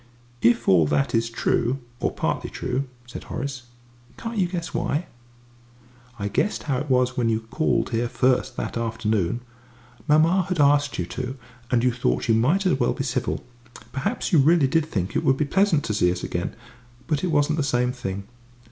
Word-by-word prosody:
"If 115 0 +3
all 85 -5 +5
that 140 - +1
is 115 0 +1
true, 120 +2 0 0.2
or - - 0
partly - - -2
true," 130 +2 -2 0.2
said 120 - -9
Horace, 130 -2 -5 0.5
"can't 230 -2 -4
you 185 - +3
guess 175 -1 -4
why?" 155 +5 -1 1.1
"I 100 - -2
guessed 205 - 0
how 135 -4 0
it 145 +1 -5
was 125 -1 +2
when 120 -3 +1
you 110 0 +1
called 115 +7 0
here 120 +1 0
first 130 0 +1
that - - -3
afternoon. 115 -2 -1 0.7
Mamma 165 +5 +4
had 180 -3 -1
asked 145 0 +3
you 90 - -1
to, 130 +7 -5 0.3
and 120 -1 +2
you 125 - +4
thought 125 +1 -1
you 115 - +4
might 150 - +2
as 180 -7 +2
well - - +2
be 135 - -3
civil; 130 -2 -2 0.5
perhaps 200 - -2
you 160 - +7
really 155 +2 +5
did 160 +3 +1
think 95 - -3
it - - +1
would 135 - +3
be 150 - +1
pleasant 175 -1 +2
to 110 - -2
see 90 -4 +3
us 90 - -4
again 85 0 -3 0.5
but 150 -1 -1
it - - +1
wasn't 150 -1 +2
the - - +1
same 125 -2 +1
thing. 100 -6 -5
130 Hz, 190 wpm, -24 LUFS, 115-150 Hz, 1.1 s, you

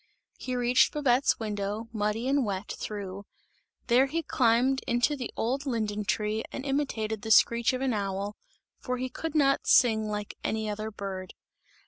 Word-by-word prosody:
He 255 - -3
reached 245 +1 +3
Babette's 275 -2 +2
window, 210 0 -3
muddy 215 +3 -1
and 275 0 +2
wet 200 -2 -3
through, 200 -1 -6 0.6
there 255 +3 +4
he 330 +4 -2
climbed 255 0 +2
into 240 +5 +2
the 250 -4 -5
old 270 +5 -1
linden 215 -4 -1
tree 215 +2 -1
and 270 - -6
imitated 225 -7 -1
the 220 - -6
screech 235 +2 +5
of 255 0 -3
an 265 -2 +1
owl, 200 0 -2 0.4
for 250 -1 -3
he 255 +1 -3
could 320 +5 -5
not 275 -2 +3
sing 220 -3 +4
like 210 -1 -4
any 220 0 -1
other 215 +1 -3
bird. 195 -3 -6
230 Hz, 160 wpm, -28 LUFS, 210-260 Hz, 0.6 s, screech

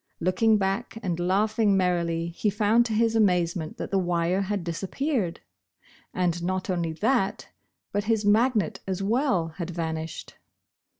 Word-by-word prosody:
Looking 215 +5 +3
back 200 +4 -2
and 175 -3 -2
laughing 205 +3 +2
merrily, 170 -2 0
he 175 +5 -1
found 215 +4 +3
to 225 - -3
his 225 +1 +2
amazement 175 -6 +1
that - - -5
the 195 - +2
wire 175 +1 +1
had 200 -1 -2
disappeared! 190 - -2 0.7
And 175 -2 0
not 185 +2 -2
only 170 -3 -1
that, 210 +2 0 0.4
but 205 +1 -1
his 220 -1 +1
magnet 215 -2 +2
as 190 0 -2
well, 225 - +1
had 170 0 -3
vanished 160 -2 -5
190 Hz, 140 wpm, -26 LUFS, 170-215 Hz, 0.7 s, Looking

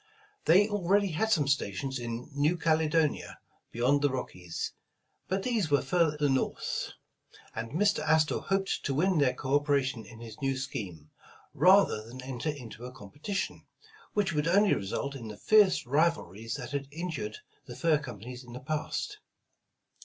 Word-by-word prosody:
They 195 +5 +6
already 200 -1 +2
had 175 +7 0
some 155 -10 +3
stations 135 0 -1
in 120 +1 -5
New 150 +5 +2
Cale 160 -2 +2
donia 155 -2 +1 0.4
beyond 130 +5 +2
the 145 - +3
Rockies, 90 -10 -4 0.6
but 190 +1 -1
these 225 -10 0
were 145 -2 +3
further 150 0 +2
North, 135 -1 -1 0.6
and 115 +3 -5
Mr. 200 +4 +3
Astor 155 0 +2
hoped 195 0 -1
to 135 - 0
win 180 +3 +3
their 130 -3 +3
co 130 +2 -3
operation 140 -5 +2
in 115 0 -12
his 115 +4 -10
new 135 -1 0
scheme, 90 - -6 0.4
rather 180 - +5
than 120 +4 -11
enter 130 +2 -3
into 125 -6 -7
a 125 - -6
competition, 145 - -5 0.5
which 200 -3 +1
would 150 0 0
only 200 +3 +5
result 110 +8 -2
in 125 -5 -7
the 105 -1 -8
fierce 205 - +4
rivalries 125 - 0
that - - -6
had 140 -1 -3
injured 175 - -4 0.3
the - - -8
fur 160 -4 +3
companies 125 -2 -8
in 120 -1 -12
the 125 - -6
past. 155 - -3
145 Hz, 160 wpm, -30 LUFS, 125-170 Hz, 0.6 s, They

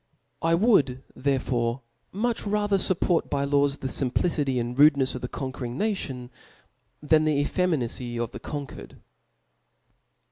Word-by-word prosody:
I 165 0 +3
would 155 - +3
therefore 130 -3 0 0.3
much 230 +4 -1
rather 205 -1 +1
fupport 180 -2 +1
by 140 -1 0
laws 140 0 +2
the 135 - -4
fimplicity 135 0 0
and 120 +1 -3
rudenefs 140 -2 +5
of 130 - -6
the 125 - -3
conquering 130 -2 -5
nation, 135 - -3 0.7
than 155 +1 +4
the 155 -1 +2
efie« 180 +5 +1
minacy 120 -5 -2
of 120 -1 -2
the - - -8
conquered. 145 -2 -7
140 Hz, 135 wpm, -26 LUFS, 125-165 Hz, 0.7 s, rudenefs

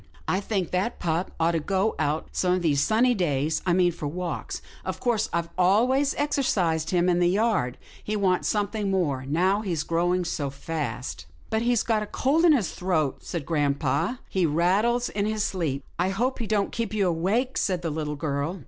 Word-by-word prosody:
I - - +1
think 195 -3 -2
that 190 +6 -1
pup 170 +1 -1
ought 165 +1 +3
to 165 - 0
go 195 +6 0
out 155 +1 -1
some 180 -1 +1
of 180 -1 0
these 145 -4 +2
sunny 235 +8 +3
days 155 - 0
— - - -24
I 175 - +4
mean 180 0 +4
for 155 -3 -5
walks. 175 +3 -4 0.2
Of - - -4
course, 235 -4 0
I've 170 0 -1
always 250 +10 +3
exercised 185 - 0
him 175 -1 +2
in 175 -1 +3
the 175 0 +4
yard, 195 - +1
but - - -22
he 215 - -2
wants 190 -3 +1
something 210 -1 -1
more, 145 -9 0
now 185 +8 +2
he's 170 -8 -2
growing 175 +2 +1
so 145 -4 -2
fast." 140 - -5
" - - -28
But 220 - +1
he's 240 -1 +2
got 220 -2 +1
a 210 - -4
cold 305 +10 +2
in 330 - +7
his 235 -10 +1
throat," 160 -7 -1
said 165 -5 -4
grampa, 145 - 0
" - - -31
he 190 - 0
rattles 200 +10 +2
in 205 0 -1
his 215 -1 0
sleep." 150 -7 -2 0.2
I 180 +1 +2
hope 245 +8 -1
he 230 - -3
don't 205 -2 +1
keep 225 -3 -3
you 200 -3 +2
awake," 200 +10 0
said 180 -3 0
the 165 - -1
little 150 -1 -3
girl. 145 +4 -2
180 Hz, 210 wpm, -26 LUFS, 160-215 Hz, 0.2 s, in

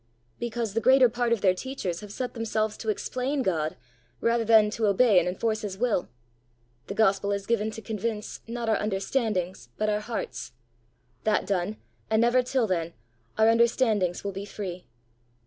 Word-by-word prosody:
"Because 235 -3 -3
the 230 - 0
greater 260 0 +6
part 240 0 -1
of 230 -4 +2
their 185 -2 +4
teachers 185 -6 -4
have 210 0 -9
set 250 +4 -4
themselves 220 -2 -1
to 220 - -4
explain 255 +6 -1
God 160 -6 -1 0.4
rather 230 0 +2
than 220 -1 +5
to 220 0 0
obey 205 -1 +5
and - - -1
enforce 215 +4 -1
his 200 -3 -5
will. 230 -5 0 0.8
The 200 - -5
gospel 200 -2 +2
is 200 -1 -2
given 220 -1 +1
to 220 0 -8
convince, 215 -1 -4
not 235 0 -4
our 220 - +3
understandings, 195 - -1
but 215 - 0
our 210 0 +1
hearts; 210 - -5 0.7
that 215 -1 +2
done, 195 +2 -1 0.3
and 220 0 +3
never 240 +2 +4
till 250 -1 0
then, 170 -4 -1 0.4
our 220 0 +5
understandings 225 -5 +2
will 200 - -2
be 195 +1 -6
free. 185 -3 -6
215 Hz, 170 wpm, -27 LUFS, 195-235 Hz, 0.8 s, greater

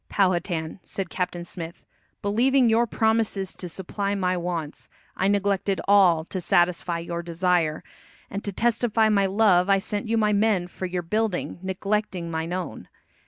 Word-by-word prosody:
"Powhatan," 175 -4 0
said 190 -4 -5
Captain 180 -2 -3
Smith, 170 -1 -8 0.4
"believing 245 +5 +3
your 230 +2 +3
promises 220 -4 0
to 180 - -7
supply 200 +3 -3
my 185 -2 0
wants, 170 -4 -4 0.3
I 190 - +1
neglected 200 -1 +1
all 185 -5 +5
to 185 +1 -5
satisfy 175 0 +2
your 170 0 -4
desire, 170 -2 0 0.4
and 200 - -5
to 200 - -3
testify 225 0 +2
my 200 -2 +3
love 190 -2 +3
I 195 - +5
sent 205 +2 -3
you 225 +1 +1
my 210 -1 +2
men 205 -4 +2
for 185 +1 -5
your 180 0 -3
building, 210 0 -1
neglecting 190 -2 -2
mine 160 +1 -3
own. 180 -1 -5
190 Hz, 155 wpm, -25 LUFS, 175-210 Hz, 0.4 s, all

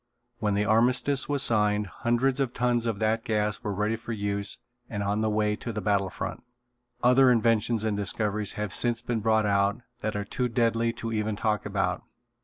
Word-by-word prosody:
When 105 -3 0
the 105 +1 +1
armistice 125 +6 +2
was 140 -2 +2
signed 105 -3 +2
hundreds 120 +7 0
of 130 -3 -1
tons 120 -1 +1
of 110 -3 -1
that 110 +2 0
gas 105 -1 -1
were 105 - -3
ready 105 +3 0
for 115 +1 -6
use 100 -1 -2 0.3
and 100 -2 -3
on 100 +2 0
the 110 - +1
way 105 0 +1
to 120 - -5
the 105 - -4
battle 100 -1 +1
front. - - -5 0.6
Other 125 +1 +6
inventions 115 -1 +2
and 110 -2 0
discoveries 105 +1 -2
have 105 -2 -3
since 120 -1 +1
been 120 -2 -1
brought 110 0 +2
out 100 +2 +1 0.2
that 110 -2 -3
are 100 -1 -2
too 125 +4 -2
deadly 115 -1 +1
to 115 0 -5
even 105 -1 -1
talk 105 0 -1
about. - - -1
110 Hz, 195 wpm, -27 LUFS, 105-120 Hz, 0.6 s, Other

